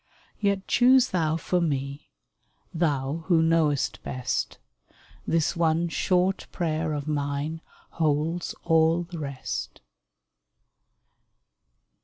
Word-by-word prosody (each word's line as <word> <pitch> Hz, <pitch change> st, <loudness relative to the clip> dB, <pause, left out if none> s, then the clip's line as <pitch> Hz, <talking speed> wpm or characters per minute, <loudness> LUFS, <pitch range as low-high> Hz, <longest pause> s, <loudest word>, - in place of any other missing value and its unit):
Yet 200 Hz, -2 st, 0 dB
choose 255 Hz, +1 st, +5 dB
Thou 160 Hz, -3 st, +1 dB
for 180 Hz, +3 st, 0 dB
me 140 Hz, -2 st, -2 dB, 0.3 s
— -, -, -42 dB
Thou 145 Hz, +1 st, -1 dB
Who 165 Hz, -3 st, +4 dB
knowest 160 Hz, -4 st, +1 dB
best; 125 Hz, -2 st, -3 dB, 0.7 s
This 165 Hz, -2 st, +1 dB
one 165 Hz, 0 st, +1 dB
short 185 Hz, +3 st, +1 dB
prayer 160 Hz, -2 st, -1 dB
of 145 Hz, 0 st, -4 dB
mine 145 Hz, +2 st, -2 dB, 0.3 s
Holds 160 Hz, +2 st, 0 dB
all 165 Hz, +1 st, +3 dB
the 170 Hz, -1 st, -8 dB
rest 140 Hz, -3 st, -5 dB
160 Hz, 100 wpm, -26 LUFS, 145-170 Hz, 0.7 s, choose